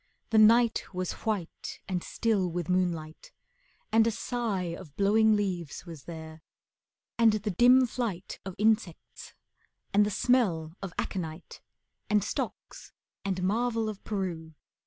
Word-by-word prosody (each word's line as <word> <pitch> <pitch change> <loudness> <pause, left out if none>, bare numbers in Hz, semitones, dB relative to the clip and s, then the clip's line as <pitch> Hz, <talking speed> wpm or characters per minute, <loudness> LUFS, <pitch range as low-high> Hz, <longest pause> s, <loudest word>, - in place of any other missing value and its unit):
The 220 - +5
night 230 +2 +5
Was 185 -1 -2 0.2
white 200 -6 -3
and 180 -2 -2
still 210 -6 0
with 175 -1 -4
moonlight, 170 -4 -1 0.6
and 225 0 +5
a - - +4
sigh 220 -6 -2
Of 165 -6 -12
blowing 215 +2 +4
leaves 180 -6 -3
was 165 -6 -10
there, 160 -1 -9 0.8
and 225 -2 +6
the 210 0 -1
dim 250 +7 +6
flight 220 -7 -4
Of 190 -2 -7
insects, 210 -5 -1 0.6
and 205 +1 +6
the 205 - +1
smell 190 -9 +1
of 195 -2 -5
aconite, 165 -3 -5 0.5
And 210 -1 +3
stocks, 205 - -5 0.3
and 190 -2 -2
Marvel 225 +2 0
of 210 -2 -8
Peru. 170 -6 -4
195 Hz, 135 wpm, -29 LUFS, 175-220 Hz, 0.8 s, and